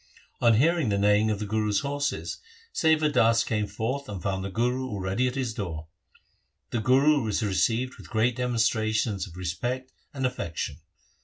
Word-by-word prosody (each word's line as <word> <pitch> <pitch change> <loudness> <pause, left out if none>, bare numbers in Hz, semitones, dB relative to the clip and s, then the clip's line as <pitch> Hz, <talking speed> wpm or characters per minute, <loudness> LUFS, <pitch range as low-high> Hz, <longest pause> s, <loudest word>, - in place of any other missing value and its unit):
On 115 -2 +5
hearing 155 +1 +3
the 100 - +1
neighing 105 +2 +3
of 105 - 0
the 105 - -4
Guru's 105 -1 0
horses, 145 0 -2 0.3
Sewa 160 -1 +3
Das 115 -6 +4
came 105 -2 -1
forth 130 +7 -3
and 100 -3 -5
found 95 +2 -2
the 100 - -3
Guru 125 +5 0
already 100 +2 -1
at 125 - -3
his 130 -4 -2
door. 80 -7 -5 0.8
The 120 - 0
Guru 135 +5 +4
was 110 0 -1
received 115 +5 0
with - - -12
great 115 +2 +1
demonstrations 110 -4 0
of 85 -1 -13
respect 120 +9 -3 0.2
and 135 -4 -3
affection. 85 - -3
115 Hz, 165 wpm, -27 LUFS, 105-130 Hz, 0.8 s, On